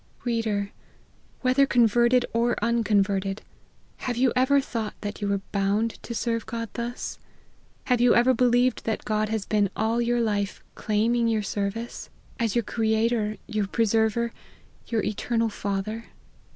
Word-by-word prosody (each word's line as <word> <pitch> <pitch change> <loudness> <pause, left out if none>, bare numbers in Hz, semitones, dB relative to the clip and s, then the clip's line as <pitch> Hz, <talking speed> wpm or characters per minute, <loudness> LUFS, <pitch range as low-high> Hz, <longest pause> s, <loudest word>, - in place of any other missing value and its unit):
Reader, 220 -4 -1 0.7
whether 260 +2 +4
converted 240 +1 +4
or 235 +1 +2
unconverted, 205 -3 +1 0.5
have 245 -2 -3
you 255 0 +3
ever 260 +3 +4
thought 230 -5 -4
that 205 +1 -5
you 205 - -1
were 200 -1 0
bound 205 +3 0
to 235 - -6
serve 230 0 -1
God 230 -1 -4
thus? 240 0 -5 0.6
have 250 -2 +1
you 245 -1 +5
ever 245 +2 +5
believed 245 0 +2
that 220 - -2
God 215 0 0
has 220 -2 -2
been 205 -2 +2
all 225 +2 +1
your 240 0 +1
life 205 -3 -1
claiming 230 +2 +1
your 220 -2 +1
service, 205 +4 -4 0.3
as 230 -2 0
your 235 - +2
crea 220 +1 +1
tor, 215 -3 -1
your 215 -3 -1
preserver, 225 +2 +1 0.5
your 225 -2 0
eternal 225 +2 0
Father 205 +2 -3
225 Hz, 145 wpm, -26 LUFS, 210-240 Hz, 0.7 s, you